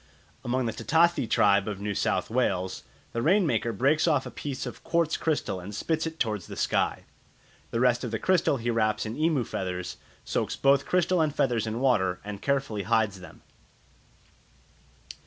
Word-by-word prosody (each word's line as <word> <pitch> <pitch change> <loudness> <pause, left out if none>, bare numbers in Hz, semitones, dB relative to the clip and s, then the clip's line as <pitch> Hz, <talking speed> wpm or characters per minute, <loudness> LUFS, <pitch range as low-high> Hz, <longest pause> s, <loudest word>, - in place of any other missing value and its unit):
Among 125 +1 0
the 115 - -2
Ta - - -8
ta 165 +2 +5
thi 150 -8 -3
tribe 100 -2 +3
of 105 -2 -4
New 105 0 -2
South 100 - -1
Wales, 95 -7 0 0.3
the 115 - -1
rain 185 - +4
maker 115 -5 0
breaks 140 - +2
off 145 -5 +2
a - - -7
piece 140 -3 -5
of - - -8
quartz 165 -2 +1
crystal 145 - -1
and 100 +3 -8
spits 160 +7 -1
it 160 0 -8
towards 105 -6 -1
the - - -8
sky; - - 0 0.7
the 115 - -2
rest 125 0 +3
of 120 - -2
the 110 - -2
crystal 180 -4 +2
he 120 0 -1
wraps 110 -2 +1
in 110 +1 -4
emu 155 -4 +1
feathers, 90 -4 -4 0.3
soaks - - -1
both 140 0 +3
crystal 180 -1 +2
and 155 -2 0
feathers 115 -4 +1
in 110 +2 -3
water, 95 -9 +2
and 105 -1 -6
carefully 135 -7 -1
hides 100 0 +1
them. 90 -4 -13
120 Hz, 185 wpm, -27 LUFS, 105-150 Hz, 0.7 s, ta